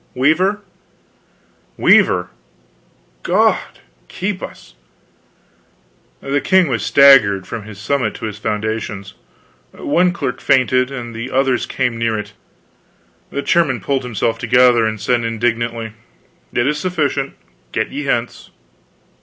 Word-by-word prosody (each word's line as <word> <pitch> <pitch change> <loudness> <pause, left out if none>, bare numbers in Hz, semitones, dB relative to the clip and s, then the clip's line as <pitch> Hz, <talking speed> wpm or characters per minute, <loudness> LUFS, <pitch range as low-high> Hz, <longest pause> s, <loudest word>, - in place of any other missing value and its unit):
"Weaver." 175 +10 +2 1.2
"Weaver! 90 0 +4 0.9
God - - +2 0.5
keep 190 0 -4
us!" - - -10 1.5
The 140 +1 -1
king 185 +1 +3
was 115 -5 -1
staggered, 110 -9 +5
from 110 -3 -7
his 105 -2 -10
summit 125 +6 -1
to - - -6
his 105 -2 -6
foundations; 105 -2 -3 0.6
one 175 +5 +1
clerk 175 - -4
fainted, 130 -1 +2
and 120 -4 -7
the 115 +3 -6
others 130 -1 +1
came 125 -3 -2
near 115 -1 0
it. 105 - -7 1.0
The 140 - -4
chairman 150 -8 +2
pulled 135 +5 -1
himself 115 -2 -2
together, 120 -1 +4
and 110 -1 -4
said 120 +2 0
indignantly: 115 0 -2 0.6
"It 120 - 0
is 150 +2 0
sufficient. 145 -6 -1 0.4
Get - - -1
you 145 +1 -5
hence." 120 -2 -2
125 Hz, 120 wpm, -18 LUFS, 110-140 Hz, 1.5 s, staggered